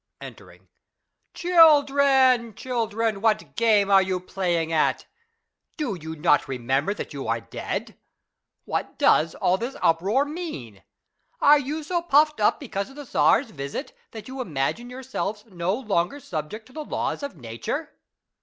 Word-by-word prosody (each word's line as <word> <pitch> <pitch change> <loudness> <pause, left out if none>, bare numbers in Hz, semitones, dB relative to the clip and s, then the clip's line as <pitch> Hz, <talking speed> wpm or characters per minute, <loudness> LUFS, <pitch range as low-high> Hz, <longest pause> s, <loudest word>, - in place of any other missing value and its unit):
{Entering.) - - -13 0.4
— - - -53
Children, 280 - +4
children, 225 -4 -2
what 215 -1 0
game 210 -4 +3
are 195 -1 +7
you 190 -1 -1
playing 175 -3 -2
at? 155 - +1 0.7
Do 295 - -2
you 160 -3 -7
not 150 -1 +2
remember 135 - -1
that - - -7
you 140 -4 -6
are 115 +1 0
dead? 115 - -6 0.7
What - - -3
does 160 +1 +3
all 185 +1 +1
this 245 +4 -4
uproar 195 +12 +2
mean? 290 - -7 0.6
Are 295 0 +6
you 295 +3 -4
so 345 +3 -1
puffed 305 -2 +3
up - - +2
because 200 -7 -4
of 270 - -15
the 290 -1 -8
Czar's 245 -1 +2
visit,'^ 140 - -6 0.2
that 220 -2 -10
you 260 0 -6
imagine 180 - -2
yourselves 250 -5 -5
no 185 -2 -2
longer 215 0 -1
subject 185 - -6
to 255 - -19
the 310 - -5
laws - - -3
of 280 - -6
Nature 115 -4 -5
220 Hz, 150 wpm, -24 LUFS, 170-270 Hz, 0.7 s, are